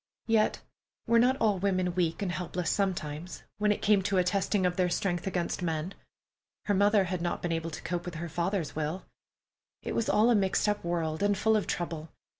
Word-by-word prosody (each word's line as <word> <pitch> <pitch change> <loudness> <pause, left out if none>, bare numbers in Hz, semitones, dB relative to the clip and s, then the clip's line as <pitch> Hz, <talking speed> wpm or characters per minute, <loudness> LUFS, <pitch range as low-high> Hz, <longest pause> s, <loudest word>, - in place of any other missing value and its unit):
Yet, 225 -2 +2 0.4
were 235 0 +4
not 255 +3 +4
all 210 -6 +2
women 185 -2 0
weak 170 0 0
and 185 - -1
helpless 180 0 -2
sometimes, 175 -4 -2 0.2
when 210 0 +3
it 210 - -2
came 205 -2 +4
to 195 0 0
a 180 - +4
testing 195 +1 +1
of 180 0 +1
their 180 -1 +2
strength 175 +1 -1
against 180 -2 -2
men? 165 +1 -2 0.7
Her 205 - +1
mother 205 +1 +4
had 180 -1 -3
not 175 0 -2
been 175 - -1
able 165 0 -2
to 155 - -8
cope 175 0 -3
with 175 -2 -6
her 170 +1 -4
father's 170 -1 -2
will. 155 +4 -3 0.8
It - - -3
was 230 - 0
all 225 +3 +4
a - - +5
mixed 195 0 +2
up 205 0 0
world, 165 -2 -2
and 205 -1 +2
full 220 +2 +3
of 210 - 0
trouble. 165 -2 -3
185 Hz, 210 wpm, -29 LUFS, 170-205 Hz, 0.8 s, a